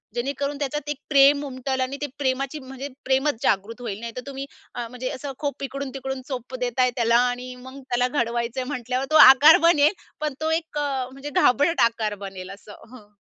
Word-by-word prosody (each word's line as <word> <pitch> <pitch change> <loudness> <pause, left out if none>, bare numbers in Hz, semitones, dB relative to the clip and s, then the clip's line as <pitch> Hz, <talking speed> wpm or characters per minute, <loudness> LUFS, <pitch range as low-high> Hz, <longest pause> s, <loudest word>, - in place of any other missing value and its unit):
जेणेकरून 280 +3 -2
त्याच्यात 295 +1 -3
एक 295 - -2
प्रेम 280 0 +5
उमटेल 260 0 -3
आणि 260 +2 -2
ते - - 0
प्रेमाची 275 +2 -1
म्हणजे, 265 +1 -8 0.2
प्रेमच 265 -1 +1
जागृत 215 +5 0
होईल 210 -4 -5
नाहीतर 235 +2 -6
तुम्ही, 275 0 -5 0.3
अ, 240 -1 -4
म्हणजे 250 +2 -5
असं 275 0 -6
खूप 285 -2 -4
इकडून-तिकडून 270 -1 -5
चोप 255 -1 -6
देताय 250 0 +1
त्याला 235 -1 +3
आणि 250 +1 -5
मग 265 +1 -10
त्याला 245 +1 +2
घडवायचंय 240 -1 -2
म्हटल्यावर 255 -1 -3
तो - - +2
आकार 285 +4 +8
बनेल, 305 +1 +4 0.3
पण 305 -2 -2
तो 315 - 0
एक 320 -2 -2
म्हणजे 275 0 -3
घाबरट 290 +4 +3
आकार 220 -2 -3
बनेल 190 -1 -8
असं 205 +1 -12 0.2
हं. 210 -4 -15
260 Hz, 175 wpm, -24 LUFS, 245-280 Hz, 0.3 s, आकार